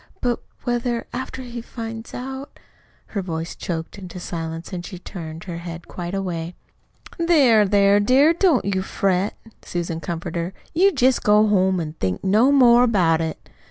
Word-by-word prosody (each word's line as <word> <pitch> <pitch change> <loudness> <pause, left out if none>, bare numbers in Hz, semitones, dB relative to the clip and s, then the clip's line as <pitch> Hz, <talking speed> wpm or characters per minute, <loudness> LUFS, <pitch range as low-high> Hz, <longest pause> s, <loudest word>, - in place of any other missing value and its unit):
But, 245 -1 -1 0.2
whether, 240 -1 -1
after 260 +1 -5
he 240 -1 -6
finds 225 -1 -7
out 265 +2 -7 0.3
" - - -35
Her 200 - -1
voice 165 -2 -4
choked 165 +3 -5
into 180 -1 -8
silence 165 0 -5
and 175 -1 -4
she 185 0 -8
turned 165 -3 -8
her 175 -3 -6
head 170 0 -8
quite 175 +1 -5
away. 175 -3 -3 0.6
"There, 270 - +5
there, 200 0 +4
dear, 265 +9 +5
don't 340 -6 +3
you 195 -1 0
fret," 190 +1 0 0.3
Susan 170 -2 -3
comforted 170 0 -4
her. 180 +3 -6 0.2
"You 385 +5 +5
jest 260 -5 +2
go 210 +1 +5
home 190 -2 +3
and 155 -1 -5
think 95 -1 -2
no 215 +8 +4
more 245 -4 +6
about 180 -9 +3
it. 160 -1 -5
195 Hz, 165 wpm, -22 LUFS, 170-245 Hz, 0.6 s, more